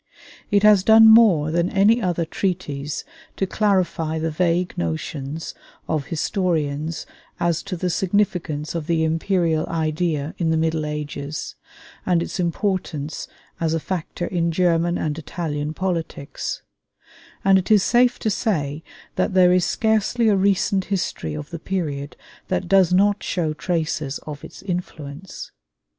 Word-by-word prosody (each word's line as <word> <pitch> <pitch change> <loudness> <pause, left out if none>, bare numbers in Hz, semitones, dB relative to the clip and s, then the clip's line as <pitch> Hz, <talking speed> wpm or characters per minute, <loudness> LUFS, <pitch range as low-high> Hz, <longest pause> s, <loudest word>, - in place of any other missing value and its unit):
It 200 0 +3
has 210 -3 +6
done 220 +1 +8
more 210 -10 +6
than 170 +2 +1
any 215 +4 +4
other 175 -4 0
treatise 155 -6 -3 0.3
to 195 - 0
clarify 185 -6 0
the 160 0 -1
vague 175 +2 0
notions 135 - -4 0.3
of 155 -4 -1
historians 160 -3 -1 0.3
as 170 -1 +1
to 195 -2 -5
the 180 +1 -1
significance 180 -6 -1
of 165 -3 -4
the 165 -1 +1
imperial 165 0 +1
idea 160 -1 -1
in 165 -2 +1
the 160 - +2
Middle 160 -1 0
Ages, 150 0 -5 0.5
and 175 -2 +2
its - - -6
importance 170 -4 -2 0.3
as 165 -1 0
a - - 0
factor 175 0 -4
in 170 -2 0
German 170 0 +2
and 155 0 -2
Italian 150 -2 -4
politics; 165 -6 -3 0.8
and 195 -1 +6
it 185 - -5
is 210 -3 +5
safe 245 0 +3
to 220 - +1
say 160 - -1 0.3
that 190 - 0
there 180 -1 +6
is 180 -1 +3
scarcely 220 +1 +1
a 205 - +4
recent 195 0 +2
history 170 - -2
of 75 - -7
the 170 - -5
period 150 -7 -3 0.3
that 185 - -1
does 190 -1 +4
not 200 +2 +3
show 160 -4 -1
traces 155 -4 -2
of 150 -2 -7
its - - -11
influence. 175 -3 -6
170 Hz, 145 wpm, -22 LUFS, 155-190 Hz, 0.8 s, done